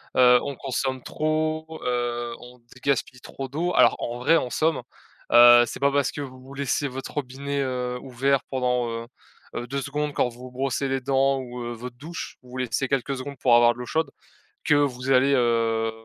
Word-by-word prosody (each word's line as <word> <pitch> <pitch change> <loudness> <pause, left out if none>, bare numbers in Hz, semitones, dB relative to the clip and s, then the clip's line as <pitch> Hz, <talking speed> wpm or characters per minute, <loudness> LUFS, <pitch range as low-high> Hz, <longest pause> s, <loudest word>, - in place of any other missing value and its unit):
heu, 125 -1 +7
on 140 - -4
consomme 130 -1 -3
trop, 155 +1 -2
heu, 120 -1 -2
on 125 +1 -14
dé 120 +2 -19
gaspille 135 -2 -1
trop 135 +2 -7
d'eau. 170 +6 -1
Alors, - - +6
en 120 +1 -4
vrai, 165 +6 +4
en 125 - -2
somme, 160 +5 +1 0.5
heu, 120 0 +9
c'est - - -7
pas 140 0 +3
parce 140 -1 +1
que 145 - -5
vous 130 0 -10
laissez 140 +1 -1
votre 135 0 -7
robinet, 140 0 -3
heu, 125 -2 -2
ouvert 135 +1 0
pendant, 125 -2 0
heu 115 0 -5 0.5
heu, 120 - -4
2 140 +2 -3
secondes 150 +1 -3
quand 125 - +1
vous 120 0 -15
vous 125 - -10
brossez 135 +1 -1
les 135 0 0
dents 135 +1 +2
ou, 125 -1 -7
heu, 120 0 -4
votre 120 +1 -8
douche, 160 +6 -7
vous 125 0 -11
laissez 125 +1 -1
quelques 135 +1 -1
secondes 140 +2 -7
pour 125 -1 +3
avoir 120 0 +6
de - - -13
l'eau 125 - -5
chaude 160 0 -1 0.5
que 150 - +3
vous 135 -2 0
allez, 135 +2 +4
heu, 115 -2 +1
130 Hz, 200 wpm, -25 LUFS, 125-140 Hz, 0.5 s, heu